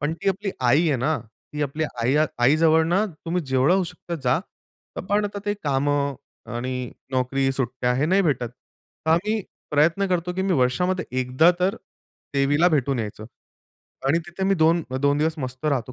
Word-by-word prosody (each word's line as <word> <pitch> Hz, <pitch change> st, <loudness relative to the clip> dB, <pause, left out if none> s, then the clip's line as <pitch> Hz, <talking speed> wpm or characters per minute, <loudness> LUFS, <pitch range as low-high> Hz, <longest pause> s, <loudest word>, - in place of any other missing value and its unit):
पण 145 Hz, +2 st, 0 dB
ती 165 Hz, -, -2 dB
आपली 195 Hz, +1 st, -1 dB
आई 145 Hz, +7 st, +3 dB
आहे 145 Hz, -, +2 dB
ना. 145 Hz, +5 st, 0 dB, 0.3 s
ती 150 Hz, 0 st, -2 dB
आपली 150 Hz, +2 st, -1 dB, 0.2 s
आई, 130 Hz, +5 st, +2 dB, 0.2 s
आई 125 Hz, +5 st, +4 dB
जवळ 160 Hz, 0 st, +4 dB
ना 185 Hz, +5 st, +2 dB, 0.2 s
तुम्ही 175 Hz, +2 st, -1 dB
जेवढं 130 Hz, +5 st, +3 dB
होऊ 190 Hz, -1 st, +2 dB
शकता 170 Hz, 0 st, -7 dB
जा. 125 Hz, +3 st, +3 dB, 0.7 s
पण 205 Hz, +1 st, +2 dB
आता 205 Hz, 0 st, -4 dB
ते 205 Hz, -, +1 dB
कामं 140 Hz, 0 st, +1 dB, 0.4 s
आणि 125 Hz, 0 st, -3 dB, 0.2 s
नोकरी, 135 Hz, +1 st, +1 dB
सुट्ट्या 125 Hz, -1 st, -1 dB
हे 135 Hz, +4 st, +1 dB
नाही 190 Hz, +4 st, +3 dB
भेटत. 135 Hz, -8 st, 0 dB, 0.6 s
तर -, -, +3 dB
आम्ही 210 Hz, +7 st, +2 dB, 0.3 s
प्रयत्न 160 Hz, +7 st, +3 dB
करतो 180 Hz, -1 st, 0 dB
की 190 Hz, -, -1 dB
मी 190 Hz, 0 st, +1 dB
वर्षामध्ये 180 Hz, +8 st, +1 dB, 0.2 s
एकदा 130 Hz, +7 st, +4 dB
तर 185 Hz, +2 st, +1 dB, 0.6 s
देवीला 145 Hz, +5 st, +3 dB
भेटून 140 Hz, -5 st, +1 dB
यायचं. 110 Hz, -1 st, -5 dB, 0.8 s
आणि 150 Hz, +5 st, +3 dB
तिथे 175 Hz, +2 st, -4 dB
मी 195 Hz, +1 st, +3 dB
2 165 Hz, 0 st, +3 dB, 0.2 s
2 140 Hz, +1 st, +2 dB
दिवस 160 Hz, +1 st, +1 dB
मस्त 130 Hz, 0 st, -6 dB
राहतो 130 Hz, -4 st, -1 dB
150 Hz, 175 wpm, -24 LUFS, 130-175 Hz, 0.8 s, आई